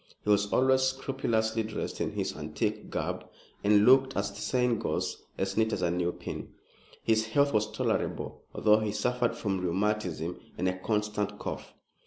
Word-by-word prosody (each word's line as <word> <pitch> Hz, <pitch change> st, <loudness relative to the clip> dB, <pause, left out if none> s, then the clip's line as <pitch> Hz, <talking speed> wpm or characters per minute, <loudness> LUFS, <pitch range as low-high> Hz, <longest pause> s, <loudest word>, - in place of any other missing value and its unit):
He 105 Hz, -, +2 dB
was 100 Hz, 0 st, +3 dB
always 130 Hz, 0 st, +4 dB
scrupulously 130 Hz, -4 st, 0 dB
dressed 110 Hz, -1 st, -4 dB
in -, -, -1 dB
his -, -, -2 dB
antique -, -, -3 dB
garb, -, -, -2 dB, 0.4 s
and 105 Hz, 0 st, +5 dB
looked, 135 Hz, +1 st, +5 dB
as 100 Hz, 0 st, 0 dB
the 100 Hz, -, -9 dB
saying 125 Hz, -3 st, +1 dB
goes, -, -, -2 dB
as 95 Hz, 0 st, -1 dB
neat 110 Hz, 0 st, +2 dB
as 90 Hz, -, -1 dB
a 85 Hz, -, +2 dB
new 90 Hz, 0 st, 0 dB
pin. -, -, -7 dB, 0.5 s
His 110 Hz, -1 st, +2 dB
health 140 Hz, +4 st, +3 dB
was 105 Hz, 0 st, +2 dB
tolerable, 110 Hz, -, -2 dB
although 105 Hz, 0 st, +4 dB
he 105 Hz, -1 st, -1 dB
suffered 125 Hz, 0 st, 0 dB
from 95 Hz, -3 st, -1 dB
rheumatism 90 Hz, -2 st, -1 dB, 0.2 s
and 90 Hz, -, 0 dB
a 95 Hz, 0 st, -1 dB
constant 105 Hz, 0 st, -1 dB
cough. -, -, -6 dB
105 Hz, 170 wpm, -29 LUFS, 100-120 Hz, 0.5 s, and